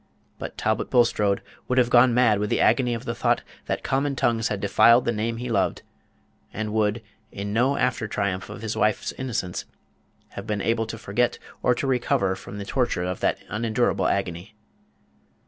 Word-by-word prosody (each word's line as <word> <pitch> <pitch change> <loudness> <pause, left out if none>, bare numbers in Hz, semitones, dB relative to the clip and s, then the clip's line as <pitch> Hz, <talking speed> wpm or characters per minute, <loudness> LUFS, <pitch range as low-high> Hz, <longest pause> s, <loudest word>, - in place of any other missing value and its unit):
But - - -7
Talbot - - 0
Bulstrode 105 -5 +2 0.2
would 125 - 0
have 125 -1 +3
gone 125 +1 +6
mad 115 -4 +3
with 105 0 -1
the - - +1
agony 125 -3 +3
of 115 - -7
the - - -2
thought - - +1 0.2
that - - -2
common 140 +1 0
tongues 115 -3 +1
had 105 - -2
defiled 115 +4 +5
the - - +2
name 115 +1 -2
he 125 +2 -5
loved, 110 -5 0 0.7
and 105 0 -4
would, 110 +1 +1 0.3
in 100 +1 -5
no 130 +5 +2
after 125 -3 0
triumph 100 -3 -2
of - - -8
his 110 -1 -2
wife's 105 -1 +1
innocence, 115 -9 -4 0.6
have 100 +2 -8
been 105 -2 -1
able 115 +1 0
to 115 - -6
forget 115 +3 0 0.2
or 125 - +3
to 130 - -3
recover 120 -7 +1
from 95 +2 -9
the 100 - -5
torture 120 -7 0
of 90 0 -3
that - - +1
unendurable 115 +3 0
agony. 95 +1 -2
110 Hz, 180 wpm, -24 LUFS, 100-120 Hz, 0.7 s, gone